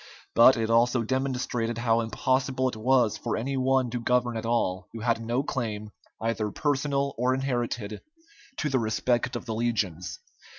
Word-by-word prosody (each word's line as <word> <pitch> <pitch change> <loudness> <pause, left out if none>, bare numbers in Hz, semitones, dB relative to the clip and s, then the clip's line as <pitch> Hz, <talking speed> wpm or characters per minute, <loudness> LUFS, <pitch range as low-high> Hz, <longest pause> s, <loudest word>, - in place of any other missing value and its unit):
But 120 +2 +7
it 115 0 0
also 120 +1 +3
demonstrated 125 -2 -1
how 115 -1 +2
impossible 130 +3 0
it 120 - -7
was 120 0 +2
for - - -2
any 135 +5 -2
one 130 -1 +2
to 120 - -2
govern 120 0 +1
at 115 0 -3
all 95 -6 0
who 115 - -6
had 115 -1 0
no 120 +4 0
claim, 110 -6 -3 0.3
either 110 -1 -1
personal 140 +1 0
or 130 +1 +2
inherited, 120 -5 -2 0.6
to 150 - -1
the 130 -1 +2
respect 120 +3 0
of 120 - -5
the 110 - -3
legions. 110 -7 -2
120 Hz, 165 wpm, -27 LUFS, 115-130 Hz, 0.6 s, But